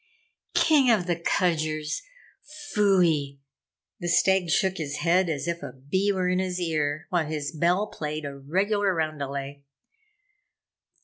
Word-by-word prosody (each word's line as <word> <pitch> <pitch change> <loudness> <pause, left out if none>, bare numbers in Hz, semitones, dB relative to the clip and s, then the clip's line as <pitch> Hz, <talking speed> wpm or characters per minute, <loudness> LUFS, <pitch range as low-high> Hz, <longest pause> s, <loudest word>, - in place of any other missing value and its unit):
"King 290 -5 +4
of 210 -7 +3
the 175 -1 0
Kudgers 155 -3 -1 0.7
pfui!" 170 -9 +2 0.6
The 175 - -4
stag 180 +1 +3
shook 190 +2 +2
his 145 -3 -4
head 175 +3 +2
as 150 0 -3
if 170 0 -2
a - - -6
bee 185 +10 0
were 185 -2 0
in 180 0 +1
his 185 -1 -2
ear, 155 -3 -1
while 170 -4 +1
his 150 -2 -3
bell 175 +5 +1
played 155 -5 -5
a 140 -1 -6
regular 190 +7 0
roundelay. 140 -3 -3
170 Hz, 135 wpm, -26 LUFS, 150-185 Hz, 0.7 s, King